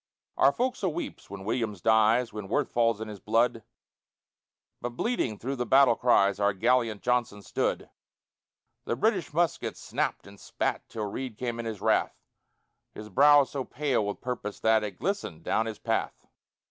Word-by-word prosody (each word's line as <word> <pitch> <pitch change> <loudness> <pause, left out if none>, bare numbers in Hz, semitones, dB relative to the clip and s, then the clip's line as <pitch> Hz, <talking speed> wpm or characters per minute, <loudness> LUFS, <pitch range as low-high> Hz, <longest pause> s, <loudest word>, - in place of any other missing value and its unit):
Our 135 - +5
fo'c'sle 245 - -1
weeps 175 - -6
when 95 0 -8
Williams 110 -3 -2
dies, 110 +3 +3
When 105 -2 -6
Worth 100 - 0
falls 115 -2 +2
in 110 - -5
his 105 -2 -8
blood, 115 +2 +1 1.2
But 120 0 -5
bleeding 180 - -1
through 135 +5 -4
the 125 - -1
battle 135 -2 +6
cries 100 -5 +3
Our 100 0 +2
gallant 115 0 +1
Johnson 120 -5 0
stood; - - -2 1.0
The - - -1
British 190 - 0
muskets 165 0 -1
snapt - - -2
and 100 0 -14
spat - - -3
Till 110 -2 -4
Reid 115 +2 -5
came 120 -2 -3
in 115 - -4
his 110 -3 -5
wrath, - - +1 0.8
His 105 0 -8
brow 145 +8 +6
so 135 0 -4
pale 135 -4 -1
with 100 0 -4
purpose 120 -5 -5
that 110 -1 +3
It 105 - -5
glistened 105 - -3
down 110 +5 0
his 110 -2 -5
path. 115 +1 -2
115 Hz, 165 wpm, -28 LUFS, 105-130 Hz, 1.2 s, battle